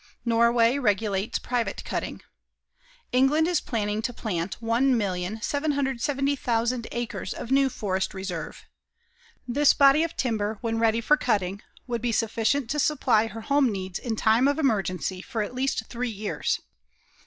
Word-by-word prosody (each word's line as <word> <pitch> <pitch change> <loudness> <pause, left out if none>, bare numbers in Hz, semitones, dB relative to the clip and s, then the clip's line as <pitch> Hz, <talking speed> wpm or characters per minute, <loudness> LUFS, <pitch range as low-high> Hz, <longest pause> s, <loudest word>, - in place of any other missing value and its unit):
Norway 235 +2 +3
regulates 205 -3 0
private 245 -2 -2
cutting. - - -4 0.9
England 270 +6 +3
is 350 -3 +1
planning 210 -4 -2
to 230 - -2
plant 195 -6 -4
1,770,000 245 - 0
acres 230 -6 -4
of 240 - -7
new 270 0 +4
forest 195 -6 -2
reserve. 185 -4 -6 0.8
This 285 +4 +4
body 280 +2 +6
of 330 0 -2
timber 220 -4 -1
when 225 -1 -1
ready 225 0 +2
for 300 +6 +4
cutting, 200 -6 -1 0.2
would 235 -3 -3
be 240 0 0
sufficient 225 +4 0
to 295 - -1
supply 260 -7 +2
her 225 +1 -8
home 280 +1 +2
needs 190 -2 -4
in 230 -3 -3
time 225 +4 +3
of 285 - +1
emergency 190 - 0
for 225 0 -3
at 205 - -6
least 255 -3 -1
three 245 +1 -3
years. 205 -7 -2
230 Hz, 140 wpm, -26 LUFS, 210-265 Hz, 0.9 s, body